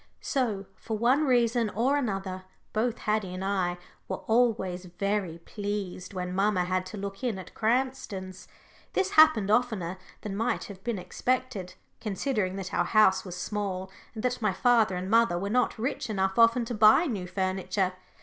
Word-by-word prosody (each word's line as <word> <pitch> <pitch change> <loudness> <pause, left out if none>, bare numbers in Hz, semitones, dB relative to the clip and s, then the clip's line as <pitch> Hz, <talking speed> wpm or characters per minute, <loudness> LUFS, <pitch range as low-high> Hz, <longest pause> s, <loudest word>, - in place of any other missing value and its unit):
So, 220 -8 -1
for 220 +3 -5
one 255 +7 +3
reason 240 -3 +2
or 245 +7 +1
another, 195 -8 -2 0.3
both 230 +2 0
Haddie 210 -4 -1
and 190 +1 -4
I 185 -3 0 0.3
were 190 - -5
always 215 -6 +1
very 185 -1 -2
pleased 200 0 -5
when 180 0 -3
mamma 195 -1 +2
had 185 0 -1
to 205 - -8
look 195 +3 -6
in 235 -6 0
at 185 - -10
Cranston's. 220 -6 -2 0.5
This 385 0 +1
happened 310 - +6
oftener 215 -6 0 0.2
than 205 -2 -5
might 225 +4 0
have 195 -2 -10
been 235 -3 -2
expected, 245 -1 -2 0.2
considering 210 -2 -1
that 190 -2 -6
our - - +2
house 215 -3 +4
was 180 -2 -7
small, 190 -1 -3 0.2
and 215 - -5
that 250 -1 -1
my 210 -3 +1
father 225 -3 +3
and 180 +1 -3
mother 225 -4 +4
were 200 +3 -3
not 250 0 +1
rich 260 +2 -2
enough 190 0 0
often 230 +1 +5
to 240 - -4
buy 215 +9 +6
new 205 - -3
furniture. 190 0 -1
205 Hz, 170 wpm, -28 LUFS, 185-235 Hz, 0.5 s, happened